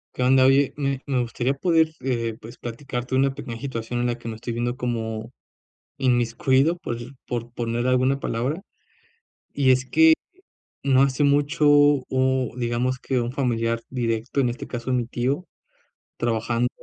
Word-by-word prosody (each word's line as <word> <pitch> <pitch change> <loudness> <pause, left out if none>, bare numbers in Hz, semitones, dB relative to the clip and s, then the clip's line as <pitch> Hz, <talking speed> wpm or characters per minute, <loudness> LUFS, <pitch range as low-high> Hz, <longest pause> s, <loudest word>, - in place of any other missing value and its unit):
¿Qué 125 - -1
onda? 130 0 +5
Oye, 135 +1 +4
me 140 -2 -2
me 130 -3 0
gustaría 120 +2 -1
poder, 160 +1 +2
eh, 115 -3 -1
pues, 115 +2 -11
platicarte 125 +1 -5
una 135 +1 +3
pequeña 115 -3 -7
situación 120 -3 -3
en 120 - +1
la 120 0 -1
que 120 - -9
me 115 - -4
estoy 115 +2 -6
viendo 120 +1 -1
como, 115 -2 -3 0.7
inmiscuido 130 +5 +2
por 120 -8 -4 0.3
por 120 -1 -4
poner 120 +1 -2
alguna 130 +2 +2
palabra. 135 +9 -2 0.9
Y 135 -2 +4
es 130 0 +1
que 320 - +6 0.7
no 135 -1 +5
hace 135 +1 +2
mucho 145 +1 +2
o 130 -3 +3
digamos 125 +1 -1
que 130 - -1
un 120 +1 -2
familiar 115 -3 0
directo, 115 0 -2
en 130 - +2
este 120 - -5
caso, 120 +1 -3
mi 125 -2 +1
tío, 130 +8 -1 0.7
trabajando, 120 +1 0
125 Hz, 155 wpm, -24 LUFS, 120-135 Hz, 0.9 s, que